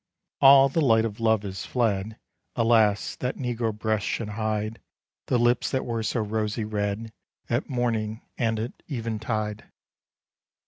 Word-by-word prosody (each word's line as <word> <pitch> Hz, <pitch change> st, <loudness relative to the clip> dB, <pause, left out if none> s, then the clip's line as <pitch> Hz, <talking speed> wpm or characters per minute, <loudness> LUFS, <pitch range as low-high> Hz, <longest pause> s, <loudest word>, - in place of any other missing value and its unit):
All 135 Hz, 0 st, +8 dB
the 150 Hz, +4 st, 0 dB
light 115 Hz, -5 st, +4 dB
of 110 Hz, -1 st, -5 dB
love 110 Hz, -2 st, +2 dB
is 95 Hz, -1 st, -5 dB
fled: 110 Hz, -3 st, -1 dB, 0.4 s
Alas! 115 Hz, -3 st, +3 dB
that 125 Hz, +1 st, -3 dB
negro 120 Hz, -3 st, -1 dB
breasts 110 Hz, 0 st, -1 dB
should 110 Hz, -3 st, -2 dB
hide 110 Hz, 0 st, -2 dB, 0.5 s
The 125 Hz, -, +2 dB
lips 120 Hz, 0 st, +2 dB
that 130 Hz, -, -1 dB
were 115 Hz, -2 st, -2 dB
so 110 Hz, +2 st, -1 dB
rosy 110 Hz, +1 st, -2 dB
red, 105 Hz, +1 st, -3 dB, 0.4 s
At 120 Hz, +6 st, 0 dB
morning 115 Hz, -4 st, -1 dB
and 115 Hz, -3 st, 0 dB
at 115 Hz, +3 st, -3 dB
even 115 Hz, -6 st, -3 dB
tide! 110 Hz, -2 st, -3 dB
110 Hz, 145 wpm, -26 LUFS, 105-120 Hz, 0.5 s, All